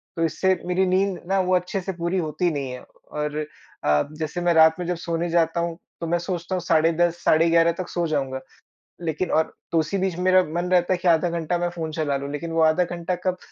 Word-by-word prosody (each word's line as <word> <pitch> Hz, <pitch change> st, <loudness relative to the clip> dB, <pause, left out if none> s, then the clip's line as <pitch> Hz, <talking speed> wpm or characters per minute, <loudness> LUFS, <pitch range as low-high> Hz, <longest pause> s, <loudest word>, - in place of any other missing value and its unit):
तो 165 Hz, -, -1 dB
इससे 190 Hz, +4 st, +1 dB
मेरी 180 Hz, +1 st, +2 dB
नींद 190 Hz, 0 st, +1 dB
ना 195 Hz, +1 st, +2 dB
वो 185 Hz, 0 st, +2 dB
अच्छे 180 Hz, +2 st, -1 dB
से 190 Hz, -, -4 dB
पूरी 170 Hz, +2 st, -2 dB
होती 165 Hz, +1 st, 0 dB
नहीं 140 Hz, -4 st, -3 dB
है 125 Hz, -, -7 dB
और 150 Hz, 0 st, -6 dB, 0.4 s
अ, 75 Hz, 0 st, +3 dB, 0.2 s
जैसे 160 Hz, +3 st, -3 dB
मैं 175 Hz, -1 st, +3 dB
रात 160 Hz, 0 st, +5 dB
में 180 Hz, -, -3 dB
जब 180 Hz, -, 0 dB
सोने 170 Hz, +1 st, -1 dB
जाता 165 Hz, 0 st, +2 dB
हूँ 170 Hz, -1 st, -2 dB, 0.2 s
तो 165 Hz, -, -2 dB
मैं 170 Hz, +1 st, +1 dB
सोचता 175 Hz, +1 st, -3 dB
हूँ 180 Hz, -, -2 dB
साढ़े 165 Hz, -1 st, +3 dB
10 175 Hz, +1 st, +1 dB
साढ़े 165 Hz, +2 st, +4 dB
11 165 Hz, 0 st, +4 dB
तक 185 Hz, -, -4 dB
सो 175 Hz, -1 st, -1 dB
जाऊँगा। 135 Hz, -4 st, -2 dB, 0.6 s
लेकिन 165 Hz, +2 st, -2 dB
और 160 Hz, 0 st, +1 dB, 0.2 s
तो 165 Hz, -, +3 dB
उसी 160 Hz, +5 st, -1 dB
बीच 190 Hz, -2 st, -1 dB
मेरा 185 Hz, 0 st, +4 dB
मन 175 Hz, +2 st, -3 dB
रहता 180 Hz, 0 st, +3 dB
है -, -, 0 dB
कि 180 Hz, -, -2 dB
आधा 170 Hz, 0 st, +4 dB
घंटा 170 Hz, 0 st, -1 dB
मैं 175 Hz, 0 st, -1 dB
फ़ोन 165 Hz, -2 st, -5 dB
चला 155 Hz, -3 st, -1 dB
लूँ 140 Hz, +1 st, -5 dB
लेकिन 165 Hz, +3 st, -5 dB
वो 165 Hz, 0 st, +1 dB
आधा 160 Hz, +3 st, +4 dB
घंटा 175 Hz, +1 st, -3 dB
कब 185 Hz, -1 st, +1 dB
170 Hz, 240 wpm, -24 LUFS, 160-180 Hz, 0.6 s, रात